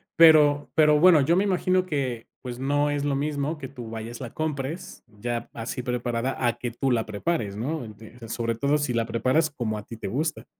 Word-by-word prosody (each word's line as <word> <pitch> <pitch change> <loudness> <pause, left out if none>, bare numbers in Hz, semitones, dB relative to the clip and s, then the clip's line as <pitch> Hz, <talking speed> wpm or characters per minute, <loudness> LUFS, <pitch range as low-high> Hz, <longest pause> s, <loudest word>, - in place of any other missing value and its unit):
pero 150 -3 +6
pero 150 -1 +5
bueno, 170 -3 +7
yo 165 +6 +3
me 195 - +3
imagino 185 -1 +1
que, 130 -8 -3
pues 125 -1 -6
no 145 +2 +1
es 145 0 -1
lo 140 -1 +1
mismo 145 +2 -1
que 135 -3 -7
tú 125 -4 -9
vayas, 115 +1 -6
la 120 - -7
compres 155 +1 -4
ya 115 +2 -5
así 115 +2 -4
preparada, 125 0 -2
a 120 0 +1
que 120 -1 -4
tú 130 +3 -1
la 115 -2 +1
prepares, 105 -1 -2
¿no? 135 +6 -3
Ent 110 +2 -12
Sobre 115 -1 -1
todo, 140 +4 +2
si 145 -4 -1
la 115 -1 +1
preparas 130 +8 +1
como 115 -6 -3
a 105 - -7
ti 115 - -9
te - - -5
gusta. 155 +6 -2
130 Hz, 210 wpm, -25 LUFS, 115-150 Hz, -, bueno